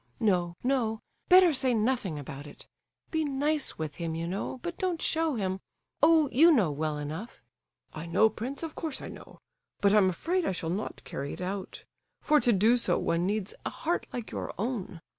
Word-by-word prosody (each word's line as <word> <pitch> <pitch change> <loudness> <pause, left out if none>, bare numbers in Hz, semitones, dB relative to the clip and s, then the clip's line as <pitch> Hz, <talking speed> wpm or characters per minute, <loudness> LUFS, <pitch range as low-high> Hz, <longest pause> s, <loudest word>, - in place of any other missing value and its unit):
No, 180 -6 +1
no! 240 -4 +1 0.3
Better 365 -2 +7
say 260 -2 +2
nothing 220 - 0
about 145 0 -8
it. - - -13 0.5
Be 320 -1 +1
nice 290 +1 0
with 155 -2 -5
him, 165 -2 -3
you 165 +1 -3
know, 195 +8 -3
but 345 0 -5
don't 360 -3 0
show 320 -2 +1
him—oh, 260 - +1
you 325 +7 +7
know 210 - +3
well 150 +1 -2
enough—" 155 +10 -6 0.5
"I 160 +2 -6
know, 215 +6 +4
prince, 245 +7 -5
of 325 - -4
course 315 -4 -3
I - - -7
know, - - -12 0.4
but 200 0 +4
I'm 205 -3 +5
afraid 345 - -1
I 195 - 0
shall 165 -2 -2
not 200 +4 -4
carry 140 +1 -5
it - - -8
out; 190 +1 -5 0.3
for 300 0 +4
to 245 - +3
do 220 +4 +4
so 235 - +1
one 170 +2 0
needs 205 -1 -2
a - - -2
heart 340 +2 -2
like 240 -3 -5
your - - -5
own. 200 -6 -3
220 Hz, 190 wpm, -29 LUFS, 175-285 Hz, 0.5 s, Better